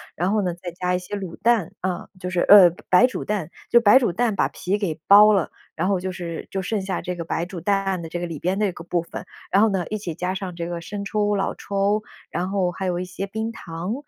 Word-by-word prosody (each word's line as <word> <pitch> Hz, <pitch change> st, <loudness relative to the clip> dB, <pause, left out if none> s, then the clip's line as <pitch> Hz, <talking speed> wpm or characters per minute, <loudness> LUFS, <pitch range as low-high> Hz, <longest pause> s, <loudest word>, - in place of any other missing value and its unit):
然 180 Hz, +4 st, 0 dB
后 215 Hz, -, +2 dB
呢， 180 Hz, -3 st, -1 dB
再 175 Hz, 0 st, -7 dB
加 180 Hz, +1 st, -1 dB
一 -, -, -1 dB
些 180 Hz, +3 st, -6 dB
卤 190 Hz, -4 st, -6 dB
蛋， 225 Hz, -7 st, +2 dB
啊， 185 Hz, -1 st, -3 dB
就 180 Hz, -1 st, -4 dB
是 180 Hz, -, 0 dB
呃， 200 Hz, -3 st, +9 dB, 0.2 s
白 185 Hz, +7 st, +7 dB
煮 255 Hz, -, -3 dB
蛋， 195 Hz, -6 st, -2 dB, 0.2 s
就 235 Hz, -, +6 dB
白 225 Hz, +4 st, +7 dB
煮 235 Hz, -8 st, +1 dB
蛋 220 Hz, +2 st, 0 dB
把 -, -, +2 dB
皮 195 Hz, +3 st, -2 dB
给 165 Hz, -6 st, -3 dB
剥 210 Hz, +1 st, +8 dB
了， 190 Hz, -5 st, +1 dB, 0.2 s
然 170 Hz, +3 st, -1 dB
后 195 Hz, -2 st, +1 dB
就 185 Hz, 0 st, -3 dB
是 170 Hz, -3 st, -6 dB
就 195 Hz, -, -2 dB
剩 205 Hz, +2 st, -2 dB
下 190 Hz, -1 st, -3 dB
这 180 Hz, 0 st, -4 dB
个 170 Hz, -, -5 dB
白 165 Hz, +1 st, -2 dB
煮 180 Hz, -1 st, -7 dB
蛋 195 Hz, -1 st, 0 dB
的 165 Hz, -, -6 dB
这 175 Hz, -, -4 dB
个 175 Hz, -, -3 dB
里 165 Hz, -4 st, -6 dB
边 185 Hz, +3 st, -1 dB
的 205 Hz, -3 st, +1 dB, 0.2 s
部 175 Hz, -1 st, +1 dB
分， 170 Hz, -, -8 dB, 0.3 s
然 195 Hz, -, +4 dB
后 225 Hz, -, +5 dB
呢， 190 Hz, -4 st, -1 dB
一 215 Hz, -, -2 dB
起 175 Hz, -6 st, -5 dB
加 180 Hz, +1 st, -2 dB
上 185 Hz, -2 st, -5 dB
这 170 Hz, 0 st, -4 dB
个 175 Hz, -1 st, -4 dB
生 200 Hz, +3 st, -6 dB
抽、 210 Hz, 0 st, 0 dB
老 195 Hz, -, -1 dB
抽， 200 Hz, +1 st, 0 dB, 0.3 s
然 180 Hz, +2 st, -2 dB
后 190 Hz, -3 st, 0 dB
还 190 Hz, +2 st, -5 dB
有 175 Hz, -1 st, -1 dB
一 180 Hz, -, -3 dB
些 190 Hz, +2 st, -5 dB
冰 220 Hz, +3 st, -3 dB
糖， 170 Hz, 0 st, -5 dB
185 Hz, 280 characters per minute, -23 LUFS, 175-205 Hz, 0.3 s, 呃